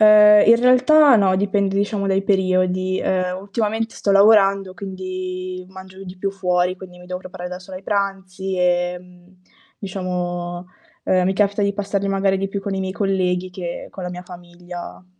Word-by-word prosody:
Eh, 210 -1 +7
in 230 - +9
realtà 255 +3 +6
no, 195 -3 +3
dipende, 200 0 0
diciamo, 200 0 -1
dai 195 0 +1
periodi. 185 -1 +1
Ehm, 185 -1 -1
ultimamente 220 +2 -3
sto 200 - 0
lavorando 195 -2 +4
quindi 185 -1 -6
mangio 190 0 -12
di 185 0 -10
più 195 +2 -2
fuori, 180 -1 0
quindi 180 -1 -12
mi 180 - -14
devo 180 0 -5
preparare 180 -1 -8
da 180 0 -7
sola 185 0 -10
i - - -18
pranzi 195 -2 -3
e, 180 0 +1
mhmm, 180 0 -20 0.4
diciamo, 180 -2 -4 0.4
ehm, 185 -1 +2
mi 190 - +1
capita 205 +1 +1
di 200 0 +1
passarli 200 -1 -2
magari 195 0 +1
di 195 - -1
più 195 0 -4
con 195 0 -3
i - - -2
miei 190 0 -3
colleghi 185 -2 -1
che 180 -2 -6
con 190 - -8
la 180 - -4
mia 180 0 -7
famiglia. 175 - -10
190 Hz, 180 wpm, -20 LUFS, 180-200 Hz, 0.4 s, in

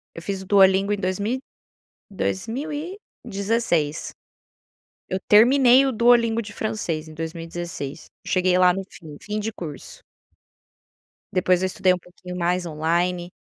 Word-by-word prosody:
eu 165 - -7
fiz 195 +2 -4
o 190 - -9
Duolingo 195 0 +4
em - - -1
dois 185 -1 -2
mil 210 +4 -1 0.6
e 200 - -22
dois 100 - -2
mil 275 +7 -4
e 325 +6 -5 0.3
dezesseis. 195 -8 -1 1.0
Eu 190 - -1
terminei 250 +4 +6
o 265 - 0
Duolingo 235 0 +4
de 205 -2 -8
francês 170 -8 -3
em 155 - -11
2016, 165 -2 -6 0.2
cheguei 185 -1 +2
lá 180 -1 +6
no 195 +1 -4
fim, 155 -4 -12
fim 210 +1 -4
de 225 +2 -3
curso. 155 -7 -9 1.3
Depois 185 -1 +2
eu 190 - +1
estudei 185 0 +2
um - - -2
pouquinho 180 0 -11
mais, 175 +1 0
online. 175 +3 -1
185 Hz, 150 wpm, -23 LUFS, 170-215 Hz, 1.3 s, terminei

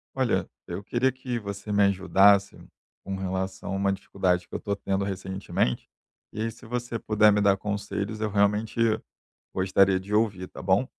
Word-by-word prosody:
Olha, - - +1 0.2
eu 100 - -5
queria 120 +6 +1
que 130 -2 -4
você 100 0 -6
me 100 0 +4
ajudasse 100 +1 +4 0.4
com 95 - -5
relação 95 0 -3
a - - -1
uma 100 0 +1
dificuldade 90 -2 -1
que - - -24
eu - - -2
tô 100 - -2
tendo 100 0 -1
recentemente. 95 -8 -2 0.4
E 110 - -4
aí 115 +1 -1
se 115 +3 -15
você 120 0 -3
puder 105 0 +4
me 105 - +2
dar 100 -1 +4
conselhos, 100 +1 -4
eu 110 0 -1
realmente 105 +2 +1 0.8
gostaria 95 0 +3
de 100 +3 -7
ouvir, 105 -4 +1
tá - - -9
bom? 95 +7 +2
100 Hz, 175 wpm, -26 LUFS, 95-105 Hz, 0.8 s, me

